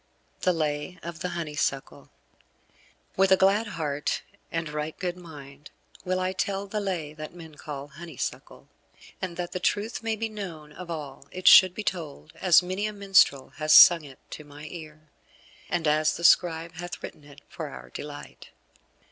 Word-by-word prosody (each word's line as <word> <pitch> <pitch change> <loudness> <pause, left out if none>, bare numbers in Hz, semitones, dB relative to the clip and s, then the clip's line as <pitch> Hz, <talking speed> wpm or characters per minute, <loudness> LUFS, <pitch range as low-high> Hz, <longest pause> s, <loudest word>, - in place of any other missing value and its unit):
X - - -8
THE 180 - +4
LAY 155 +2 -2
OF 170 -1 -7
THE 180 - -3
HONEYSUCKLE 150 -5 -3 1.1
With 190 0 +3
a 190 - +7
glad 200 +4 +3
heart 150 -6 -2 0.3
and 165 -1 -2
right 150 +1 -4
good 180 -2 -3
mind 150 -5 -12 0.3
will 185 0 -1
I 185 0 0
tell 195 +1 -2
the 210 +2 -3
Lay 175 -7 -3
that 155 +2 -9
men 165 -3 -11
call 145 -1 -8
Honeysuckle; 165 -1 -7 0.5
and 180 -3 -4
that 175 -1 -4
the 185 - -3
truth 210 +6 -1
may 225 -1 -1
be 225 +1 -2
known 180 -8 -8
of 180 +2 -9
all 145 -4 -7
it 185 0 -4
shall 185 - +10
be 195 +4 -7
told 155 - -5
as 180 -1 +5
many 185 +4 -2
a 215 - -5
minstrel 195 -9 +3
has 155 0 +4
sung 170 -3 +9
it 135 -3 -12
to 155 - -7
my 145 0 -13
ear, 155 -2 -11 0.6
and 165 -2 0
as 155 +1 +2
the 170 - -8
scribe 165 -1 +3
hath 175 +1 -7
written 150 - -8
it 145 0 -15
for 160 - -6
our - - -11
delight. 145 0 -9
165 Hz, 175 wpm, -27 LUFS, 150-185 Hz, 1.1 s, shall